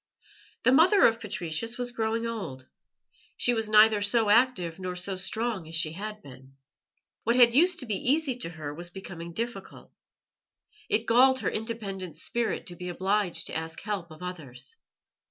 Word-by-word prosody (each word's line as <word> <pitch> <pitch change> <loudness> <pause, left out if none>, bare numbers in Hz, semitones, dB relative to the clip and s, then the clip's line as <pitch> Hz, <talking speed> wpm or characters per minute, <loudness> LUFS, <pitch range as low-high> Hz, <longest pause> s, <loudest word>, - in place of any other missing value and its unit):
The - - +5
mother 355 +9 +6
of 230 0 +3
Patricius 210 +2 -3
was 245 0 -3
growing 225 0 -1
old; 165 - -5 0.7
she 245 - +2
was 225 -2 -1
neither 215 0 +6
so 205 +1 +3
active 210 -8 +2
nor 185 -1 -4
so 180 +2 -3
strong 210 -1 -3
as 165 - -7
she 160 -1 +1
had 210 +4 -7
been. 130 0 -14 0.7
What 235 +2 +2
had 240 -2 +7
used 345 +6 +4
to - - -4
be 210 -4 -1
easy 295 -4 +1
to 165 - -4
her 155 -3 -7
was 175 +3 -7
becoming 175 -2 -8
difficult. 235 +7 -6 1.0
It 220 +2 +1
galled 260 +3 +5
her - - 0
independent 205 -6 -5
spirit 235 -1 -2
to 175 - -8
be 180 +1 -6
obliged 190 +1 -1
to - - -5
ask 160 +1 -4
help 200 -6 -4
of 155 +2 -12
others. 170 - -7
210 Hz, 170 wpm, -28 LUFS, 175-235 Hz, 1.0 s, had